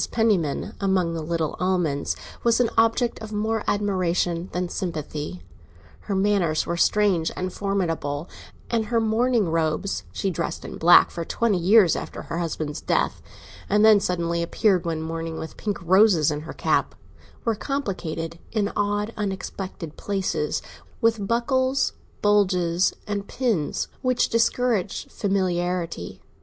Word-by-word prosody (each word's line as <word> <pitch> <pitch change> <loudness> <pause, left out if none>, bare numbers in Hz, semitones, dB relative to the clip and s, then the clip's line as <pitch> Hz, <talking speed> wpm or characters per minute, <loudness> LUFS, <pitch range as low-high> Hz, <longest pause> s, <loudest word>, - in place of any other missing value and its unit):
Penniman, 205 -4 +1
among 185 -4 +1
the 165 - -3
little 160 0 -2
Almonds, 180 -6 0 0.3
was 235 0 +3
an 245 -2 +2
object 230 +1 +2
of 220 -1 -7
more 220 +1 -1
admiration 180 -3 0
than 180 0 -1
sympathy. 155 - -4 0.6
Her 200 - -3
manners 190 -5 +2
were 170 - -2
strange 185 -2 +2
and 185 0 -3
formidable, 170 -6 -2 0.4
and 225 -2 +1
her 230 +1 +1
mourning 225 -2 +2
robes—she 165 +4 -1
dressed 170 - -4
in - - -7
black 175 +2 +7
for 170 - -4
twenty 210 +2 0
years 190 0 +5
after - - -6
her 165 - -4
husband's 155 -3 -3
death, - - 0 0.5
and 210 +2 +4
then 215 -2 +7
suddenly 170 -3 -1
appeared 185 +1 +2
one 160 -1 -2
morning 165 0 -4
with 160 - -7
pink 205 -2 -3
roses 185 -4 +5
in 150 - -2
her 160 - -8
cap—were 230 - -2
complicated 185 - -4
in 210 -2 0
odd, 205 +2 0
unexpected 190 -5 -5
places 185 -7 -1 0.4
with 225 -3 +1
buckles, 260 +3 +1 0.3
bugles, 185 -4 +3
and 205 -1 -3
pins, 225 - -1
which 255 -1 +2
discouraged 230 -3 0
familiarity. 180 - -2
190 Hz, 130 wpm, -24 LUFS, 165-215 Hz, 0.6 s, black